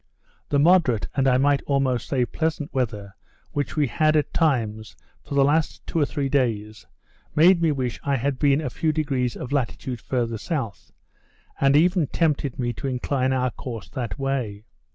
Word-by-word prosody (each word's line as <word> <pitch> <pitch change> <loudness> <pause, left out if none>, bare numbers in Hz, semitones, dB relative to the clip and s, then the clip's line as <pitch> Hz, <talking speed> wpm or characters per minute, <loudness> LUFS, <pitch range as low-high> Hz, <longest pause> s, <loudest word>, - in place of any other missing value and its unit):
The 145 - +2
moderate, 145 - +4
and 135 -1 +2
I 125 -1 +4
might 140 +1 +3
almost 135 -4 +1
say, 130 -3 +1
pleasant 160 +1 -3
weather, 105 -6 -2 0.4
we 145 +1 0
had, 155 +4 +2
at 145 -2 +1
times, 110 - 0 0.3
for 140 - -7
the 140 - +5
last 155 +3 0
two 165 - -2
or 145 - +2
three 145 -3 -2
days, 110 -6 -1 0.5
made 170 +3 +6
me 165 -2 +3
wish 130 -4 -2
I 140 -1 +1
had 135 +1 -1
been 145 0 +3
a 150 - -3
few 160 - 0
degrees 135 -6 -1
of 125 - -7
latitude 130 -3 -2
farther 115 -3 -2
south; 130 - -4 0.7
and 135 0 +4
even 175 -1 +3
tempted 150 -5 0
me 120 -1 -1
to - - -2
incline 130 0 0
our 130 -1 +1
course 115 -2 -7
that 125 -3 -4
way. 130 -7 -2
135 Hz, 175 wpm, -24 LUFS, 125-150 Hz, 0.7 s, made